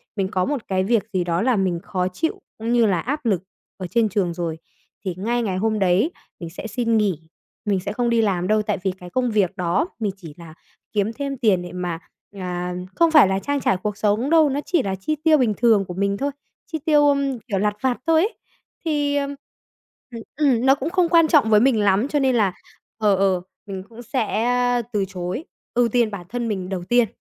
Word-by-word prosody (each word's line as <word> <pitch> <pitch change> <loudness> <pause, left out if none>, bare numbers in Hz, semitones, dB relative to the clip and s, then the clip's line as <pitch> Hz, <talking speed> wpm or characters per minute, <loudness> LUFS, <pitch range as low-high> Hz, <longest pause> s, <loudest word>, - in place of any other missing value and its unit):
mình 195 -2 0
có 185 -2 +1
một 280 -5 -3
cái 185 -1 +1
việc 220 -1 +2
gì 185 -2 +1
đó 170 0 0
là 245 +1 +2
mình 185 -3 0
khó 180 -1 -1
chịu 190 - -3 0.2
cũng 230 +2 -2
như 235 -1 +4
là 190 -5 +2
áp 285 - -3
lực 195 -5 +1 0.3
ở 185 -2 -5
trên 220 +4 +2
trường 185 -4 0
rồi 165 -2 -3 0.5
thì 180 -2 -2
ngay 235 +5 0
ngày 190 -4 -1
hôm 215 +2 0
đấy 195 - +2 0.3
mình 170 -2 -6
sẽ 185 +6 -7
xin 230 0 0
nghỉ. 200 -7 +1 0.5
Mình 200 -2 +1
sẽ 200 +2 -4
không 240 +1 0
đi 230 -1 +3
làm 185 -4 0
đâu 215 +1 +3
tại 205 - -1
vì 190 - +1
cái 180 -1 -11
công 250 +2 0
việc 200 -5 +1
đó 180 - +1
mình 210 -3 -1
chỉ 165 -6 -10
là 165 -2 -11 0.4
kiếm 210 +2 0
thêm 275 +1 -4
tiền 205 -7 +2
để 175 -1 -8
mà 175 -2 -3 0.4
à, 180 -1 -3 0.2
không 335 -1 +4
phải 300 -10 +7
là 190 0 0
trang 285 +7 -1
trải 190 - +2
cuộc 210 -1 -2
sống 215 +6 +1
đâu, 320 -3 +5
nó 275 - -1
chỉ 345 -5 +1
là 195 -1 -2
chi 195 +11 -2
tiêu 315 -2 +5
bình 235 -5 +2
thường 220 -5 +4
của 180 - -7
mình 200 +2 0
thôi, 280 +1 -1 0.4
chi 315 - -2
tiêu, 295 -2 +5
ưm, 280 -3 +1
kiểu, 215 -3 -3
lặt 210 +1 +1
vặt 260 -2 +1
thôi 325 -1 +5
ấy. 420 +6 0 0.5
Thì, 290 -2 0
ờm, 280 0 -1 0.8
ừm, 230 - -7
ừm 265 -5 +2
nó 270 +1 +6
cũng 285 +2 -3
không 360 -1 +2
quan 330 -1 +5
trọng 290 -8 +4
với 210 - +6
mình 240 -1 +3
lắm 205 +4 +3
cho 290 0 0
nên 265 -2 +2
là, 200 -5 +2 0.4
ờ, 210 -3 +3
ờ, 190 -2 +2 0.2
mình 190 -2 -6
cũng 230 +1 -11
sẽ 245 0 +1
từ 200 -2 +1
chối 185 - -5 0.3
ưu 240 -1 +3
tiên 235 -2 +2
bản 185 -3 -7
thân 240 -1 -3
mình 190 -4 -3
đầu 185 -2 -3
tiên. 240 -1 +4
215 Hz, 230 wpm, -22 LUFS, 190-260 Hz, 0.8 s, phải